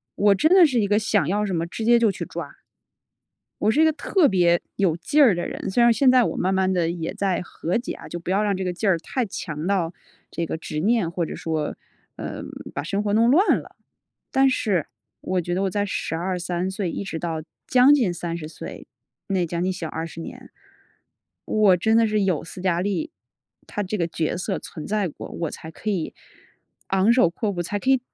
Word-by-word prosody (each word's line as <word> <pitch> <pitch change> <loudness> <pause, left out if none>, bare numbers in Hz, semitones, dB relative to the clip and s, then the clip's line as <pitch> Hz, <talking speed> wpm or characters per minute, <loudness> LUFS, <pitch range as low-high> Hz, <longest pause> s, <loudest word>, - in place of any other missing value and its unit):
我 205 0 +4
真 310 +11 +3
的 375 -2 +8
是 260 -6 +1
一 200 - +1
个 205 +1 +3
想 180 -8 +1
要 205 +4 +1
什 195 - -3
么 165 0 -1
直 220 +6 -5
接 235 0 +6
就 225 -2 +4
去 - - -6
抓。 - - -7 1.0
我 215 - +3
是 300 - +3
一 320 - +6
个 315 - +4
特 305 +1 +2
别 175 -3 +3
有 185 -5 +2
劲 295 - +2
儿 225 -7 +6
的 175 - -3
人， - - -5
虽 240 - +2
然 235 - +6
现 255 +3 +4
在 255 -2 +5
我 - - -2
慢 185 +2 +1
慢 190 0 +2
地 175 -3 +1
也 165 -2 -4
在 195 -3 0
和 175 0 -4
解 240 - -4
啊， - - -11
就 175 - -6
不 170 - -7
要 195 +3 +2
让 205 -2 +1
这 190 - -3
个 180 - -1
劲 205 +4 -2
儿 170 -3 +3
太 250 +8 -2
强 155 -6 -5
到 185 -4 +1 0.4
这 170 - -2
个 - - -3
执 150 -2 -4
念 210 -1 +2
或 170 0 -2
者 - - -6
说， 155 -2 -2 0.4
呃， - - -5 0.3
把 145 - -2
生 195 +5 -1
活 205 -1 0
弄 230 +3 +4
乱 365 +9 +5
了。 - - -14 0.6
但 270 0 +4
是 200 - 0 0.4
我 185 -1 -1
觉 175 +1 -3
得 190 - 0
我 195 - +1
在 205 +1 0
12-13 180 0 -2
岁 190 -2 -3
一 - - -4
直 190 -4 -5
到 165 -2 -3 0.3
将 255 +3 +6
近 225 -11 +1
30 170 -2 -5
岁， - - -9 0.4
那 190 -2 +1
将 170 +1 -2
近 185 0 0
小 170 -3 -5
20 165 +1 -6
年， - - -10 0.9
我 210 -4 +4
真 220 +5 +3
的 230 - +5
是 215 -1 +1
有 185 -6 0
斯 180 +2 -9
嘉 180 -2 +1
丽， 205 - -1 0.6
她 205 - -3
这 210 +3 -3
个 170 - +1
角 165 0 -2
色 190 +2 -2
存 155 - -8
在 210 -2 0
过， 155 - -9
我 165 -3 -3
才 160 - -9
可 215 - -5
以 185 -6 -2 0.8
昂 195 +4 +4
首 245 -7 +5
阔 205 +5 -2
步， 175 -3 -3
才 205 +4 -3
可 260 - -2
以 265 -1 +5
190 Hz, 235 characters per minute, -23 LUFS, 170-215 Hz, 1.0 s, 的